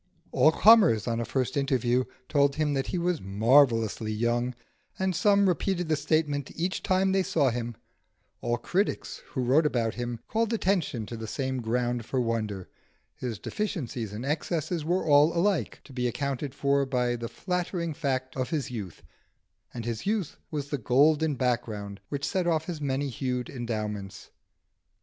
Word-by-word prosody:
All 155 - +5
comers, 200 - +6
on 115 -1 0
a 115 - -1
first 130 +5 -1
interview, 130 -3 +1 0.2
told 140 -2 +3
him 150 -1 +1
that 135 -1 -1
he - - -2
was 175 -1 0
marvellously 115 +1 +3
young, 120 +3 0 0.4
and 190 -1 0
some 200 0 +4
repeated 180 -1 0
the 155 - +3
statement 145 -1 0
each 180 +3 -2
time 190 +1 +2
they 190 0 +3
saw 145 -7 +2
him; 120 0 -4 0.7
all 120 0 0
critics 185 - -1
who 130 - -3
wrote 145 +6 +4
about 115 -5 0
him 120 -1 -4
called 225 +1 0
attention 180 - 0
to 115 - -7
the 110 -1 -6
same 130 +2 -2
ground 120 +1 -1
for 130 +4 -2
wonder: 110 -5 -2 0.5
his 120 -4 -5
deficiencies 125 - -3
and 110 +5 -5
excesses 160 +2 -1
were 175 +4 +1
alike 165 +6 +3
to 135 - -14
be 125 -1 0
accounted 140 +2 -3
for 140 0 +2
by 125 -2 0
the 115 -1 -5
flattering 175 +3 -2
fact 130 -4 -2
of 130 -1 -2
his 145 -6 -2
youth, 100 -8 -7 0.7
and 115 -2 -6
his 115 - -4
youth 205 -7 -1
was 145 -2 -4
the 145 - -1
golden 145 +5 +3
background 110 -6 -2
which 140 -1 -2
set 185 -3 0
off 160 -2 +1
his 165 -3 -5
many 140 0 -1
hued 125 -1 -3
endowments. 105 -5 -5
135 Hz, 165 wpm, -28 LUFS, 120-160 Hz, 0.7 s, comers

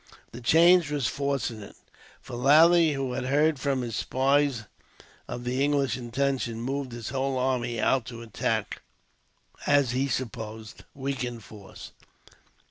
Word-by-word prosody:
The 120 - -9
change 165 +5 +5
was 145 -4 -1
fortunate, 120 -5 -3 0.5
for - - -12
Lally, 160 +5 +5
who 135 -2 -3
had 130 0 -3
heard 145 +2 +2
from 135 -2 -1
his 115 -3 -4
spies 135 0 +1 0.6
of 120 - -6
the 125 +2 -1
English 140 -4 +1
intentions, 125 -1 -2
moved 130 +2 -3
his 115 -2 -6
whole 135 +1 -1
army 125 -2 -1
out 125 +2 +2
to 115 -1 -8
attack 110 -3 -2 0.8
the - - -1
as 140 -4 +3
he 130 +3 0
supposed 110 -4 -6
weakened 130 -4 -4
force. 100 -1 -12
130 Hz, 135 wpm, -27 LUFS, 120-140 Hz, 0.8 s, change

